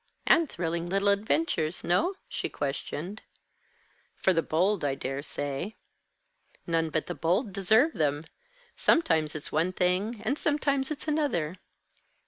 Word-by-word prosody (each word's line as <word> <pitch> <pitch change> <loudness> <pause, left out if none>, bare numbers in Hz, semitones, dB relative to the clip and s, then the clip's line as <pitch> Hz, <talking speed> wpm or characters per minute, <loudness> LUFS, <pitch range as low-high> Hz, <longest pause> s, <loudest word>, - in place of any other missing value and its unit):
"And 330 -4 +5
thrilling 170 0 -2
little 195 +2 +2
adventures 200 - +1
no?" 340 - +2
she - - -3
questioned. 150 +7 -4 0.9
"For 190 - +2
the 165 - +2
bold, 180 +5 +1
I 140 -2 +1
dare 135 0 -4
say." 145 +7 -4 0.9
"None 165 -1 +1
but 155 0 -1
the - - -4
bold 185 - 0
deserve 220 - +4
them. 150 -1 0 0.5
Sometimes 160 - +2
it's 150 - -6
one 170 +4 +1
thing, 190 +5 0
and 275 +7 0
sometimes 280 -2 +1
it's 305 0 -5
another." 235 - 0
180 Hz, 130 wpm, -28 LUFS, 155-225 Hz, 0.9 s, And